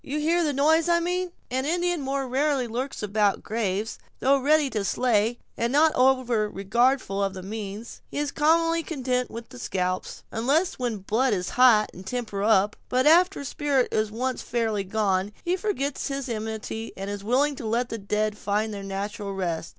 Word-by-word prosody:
you 285 +2 -3
hear 335 +3 +2
the 300 - +1
noise 315 +4 +3
I 340 0 +4
mean!" 360 +1 -1 0.2
"An 260 +1 0
Indian 350 +2 0
more 270 0 -2
rarely 270 0 +1
lurks 250 +2 -4
about 205 -1 +2
the - - -17
graves. 215 -1 -2 0.2
Though 275 +1 +3
ready 295 +2 +3
to 210 -2 -1
slay, 230 +1 +1 0.2
and 235 +1 -1
not 310 +3 +4
over 250 -4 +2
regardful 205 +1 +1
of 195 -1 -2
the 185 - -7
means, 210 +2 -7
he - - -7
is 290 -1 -1
commonly 330 +2 +3
content 255 -6 -2
with 230 0 -8
the 250 - -11
scalp, 185 -5 -1 0.3
unless 280 +11 +1
when 240 -4 -1
blood 250 +5 +2
is 180 -2 -2
hot, 240 -4 +5
and 185 - -10
temper 215 -1 -4
up; 210 -1 +3
but 255 +1 +2
after 345 +1 +5
spirit 280 -2 0
is 215 0 +1
once 250 +4 -2
fairly 225 -4 -1
gone, 195 0 0
he 350 +1 +2
forgets 320 -9 -2
his 275 -1 -3
enmity, 220 0 -4
and 195 +1 -4
is 205 -1 -5
willing 275 +6 +2
to 225 - -5
let 235 +3 0
the 230 - -4
dead 210 +1 -1
find 210 +1 -1
their 200 - -5
natural 200 +1 -4
rest. 170 -3 -2
240 Hz, 190 wpm, -25 LUFS, 210-280 Hz, 0.3 s, hot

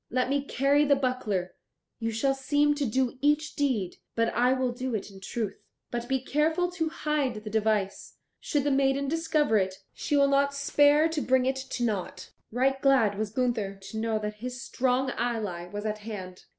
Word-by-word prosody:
Let 255 +1 0
me 280 0 +1
carry 280 +1 +2
the 285 -1 +4
buckler; 240 -9 -1 0.5
you 225 - -1
shall 225 +5 +1
seem 290 +2 +2
to 290 -2 -1
do 255 +2 0
each 295 +1 +1
deed, 240 -11 0 0.2
but 230 0 +2
I 250 +1 +3
will 260 -1 +1
do 250 0 -3
it 205 -1 -4
in 195 - -12
truth. 205 +1 -4 0.3
But 240 0 -3
be 265 +1 +1
careful 320 +5 +1
to 325 -3 -1
hide 285 -8 -1
the 215 - -6
device. 215 -2 0 0.2
Should 290 -2 -1
the 290 - +1
maiden 270 0 +2
discover 305 -6 +2
it, 190 -1 -1 0.2
she 295 - -1
will 280 0 +5
not 280 0 +2
spare 290 +2 +4
to 320 -2 -2
bring 260 -1 +2
it 265 +1 0
to 265 -2 -4
nought." 210 -6 -3 0.2
Right 265 +3 +1
glad 260 -7 +4
was 215 -1 -1
Gunther 225 -4 -1
to 195 +2 -9
know 225 0 0
that 210 0 -4
his 250 0 -5
strong 260 0 0
ally 210 -8 -2
was 205 +3 -6
at 215 0 -2
hand. 190 -4 -8
255 Hz, 190 wpm, -28 LUFS, 215-280 Hz, 0.5 s, will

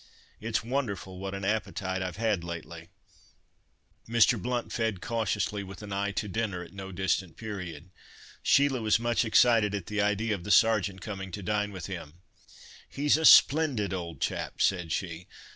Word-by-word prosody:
It's 110 0 -2
wonderful 105 -8 -3
what 95 0 -4
an 100 0 -5
appetite 100 -3 -2
I've 90 -2 -4
had 110 -6 0
lately." 85 0 -7 1.2
Mr. 115 -1 +4
Blount 120 +3 -2
fed 110 -5 -1
cautiously, 105 -1 -1
with 95 +2 -10
an 100 -1 -6
eye 100 +1 -1
to 105 - -2
dinner 100 -3 -2
at 90 - -14
no 95 -1 -7
distant 95 -2 -1
period. 95 -5 -7 0.5
Sheila 140 -3 +3
was 110 -1 +3
much 120 0 +1
excited 110 -2 +4
at 100 -4 -4
the 105 -1 -1
idea 105 +2 +1
of 95 -4 -5
the 105 - -7
Sergeant 105 -4 +3
coming 95 -2 -6
to 100 - -5
dine 105 +1 -1
with 95 -4 -7
him. 85 -5 -7 0.7
"He's 145 +1 +2
a 160 +1 0
splendid 135 -13 +6
old 85 -5 -5
chap," - - -3
said 90 -4 +1
she. 90 0 -4
100 Hz, 165 wpm, -28 LUFS, 95-110 Hz, 1.2 s, splendid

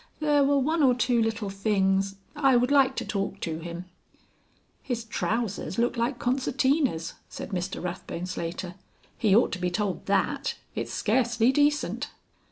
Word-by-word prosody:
There 295 -2 +3
were 280 +1 +3
one 310 +4 +1
or 255 -3 +5
two 245 -1 +2
little 220 -2 -1
things... 195 -1 +1 0.2
I 275 -3 +4
would 245 +2 +3
like 270 -2 +4
to - - -3
talk 195 -1 -3
to 160 -1 -3
him." 170 +2 -6 1.0
"His 240 -3 -3
trousers 210 -1 -2
look 240 +2 +1
like 240 +2 0
concertinas," 260 - +1 0.2
said - - -7
Mr 185 -1 -3
Rathbone 180 -1 -4
Slater. 175 0 -4 0.4
"He 210 -4 +3
ought 230 - +4
to 185 - -3
be 180 0 0
told 190 +1 -2
that. 275 +9 0 0.2
It's - - -4
scarcely 240 +1 +2
decent." 295 +2 +1
225 Hz, 155 wpm, -27 LUFS, 190-265 Hz, 1.0 s, or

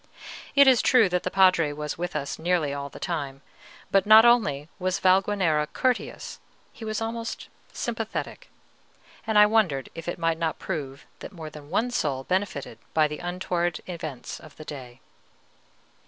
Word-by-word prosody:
It 280 -1 +7
is 255 -3 +6
true 245 -5 +5
that 180 0 0
the 185 - -2
Padre 185 -5 +4
was 150 0 -4
with 175 +1 -4
us 140 - -3
nearly 165 -4 0
all 140 0 -5
the - - -12
time; 140 -5 -4 0.5
but 195 0 +3
not 220 +2 +9
only 155 - +3
was 185 0 0
Valguanera 185 -5 +2
courteous, 255 -2 -2 0.3
he - - -11
was 215 0 -3
almost 230 0 -5 0.2
sympathetic; - - -4 0.8
and 220 -1 +2
I 210 - +9
wondered 195 - +1
if 165 0 -9
it 175 - -3
might 165 -1 0
not 165 -2 -1
prove 140 -6 -5
that - - -8
more 160 -4 -8
than 150 -1 -12
one 245 +8 0
soul 140 - -1
benefited 180 - -2 0.2
by 155 -1 +4
the 150 0 -6
untoward 175 -2 -2
events 155 -7 -6
of 155 - -15
the 155 - -11
day. 130 -4 -9
175 Hz, 165 wpm, -26 LUFS, 150-200 Hz, 0.8 s, not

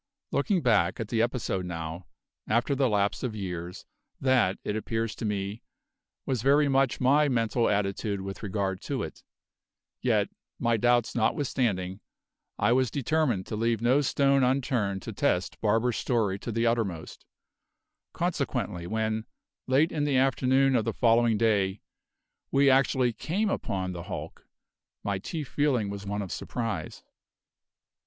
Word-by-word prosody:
Looking 170 +6 +1
back 100 -7 +2
at 110 -2 -4
the 115 -2 +1
episode 115 -5 -1
now, 85 0 -6 0.4
after 120 +6 +1
the 135 -2 +2
lapse 100 -1 +1
of 125 -4 -3
years, 90 -3 -5 0.3
that, 125 -8 +2
it 105 - -2
appears 115 0 -2
to - - -6
me, 100 +1 -3 0.6
was 130 -5 -1
very 145 +3 +4
much 135 -2 +2
my 145 +3 +4
mental 115 -1 +1
attitude 100 0 -1
with 95 0 -6
regard 95 -2 -2
to - - -3
it; - - -8 0.8
yet, - - +2 0.3
my 120 -1 +1
doubts 120 +1 +2
notwithstanding, 110 -6 0 0.6
I 105 +3 +2
was 130 0 +3
determined 140 -7 0
to - - -5
leave 115 0 +1
no 125 +5 +3
stone 140 0 +3
unturned 125 -7 0
to - - -6
test - - 0
Barber's 115 +3 +2
story 105 -6 0
to 120 - -5
the 115 +1 0
uttermost; 110 -9 -2 0.9
consequently 85 -1 -2
when, 110 +2 -1 0.4
late 140 +5 +3
in 150 - -1
the 145 -3 +2
afternoon 135 0 +3
of 115 - +2
the - - -2
following 115 -2 +3
day, 100 -3 +1 0.7
we 140 0 +4
actually 130 -2 +3
came 195 - -1
upon 95 - -2
the 85 -1 -6
hulk, - - -7 0.6
my 100 -2 -1
chief 150 - -5
feeling 125 -9 +1
was 100 0 -7
one 100 +1 -2
of 95 - -7
surprise. 110 -5 -4
115 Hz, 145 wpm, -28 LUFS, 100-130 Hz, 0.9 s, very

